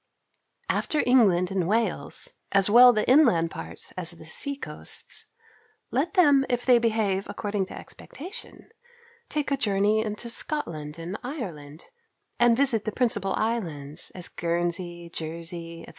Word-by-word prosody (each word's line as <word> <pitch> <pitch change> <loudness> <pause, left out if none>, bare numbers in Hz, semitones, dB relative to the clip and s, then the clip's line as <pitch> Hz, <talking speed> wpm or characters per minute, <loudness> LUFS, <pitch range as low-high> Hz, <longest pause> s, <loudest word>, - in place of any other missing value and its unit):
After 305 - 0
England 195 -8 +4
and 185 -3 0
Wales, 225 +4 -1 0.2
as 195 0 +4
well 245 +2 +9
the 215 -3 -1
inland 235 - +5
parts 80 0 -6
as 180 -2 -4
the 170 -2 -9
sea 280 - -2
coasts, 275 - -5 0.6
let 330 +9 -1
them 290 -7 +5
if 245 0 -1
they 250 -2 +6
behave 215 -4 0
according 205 -2 -2
to - - -9
expectation, 390 +10 -10 0.6
take 300 -1 -2
a 280 - +2
journey 210 -1 +2
into 215 +2 -4
Scotland 165 - -2
and 170 +5 -6
Ireland, 170 - -7 0.5
and 240 -1 +5
visit 255 -6 +2
the 215 - -1
principal 205 -5 0
islands, 165 -10 -3
as 180 -2 -1
Guernsey, 175 0 -3
Jersey, 165 +1 -6
&c. - - -10
205 Hz, 140 wpm, -26 LUFS, 170-245 Hz, 0.6 s, well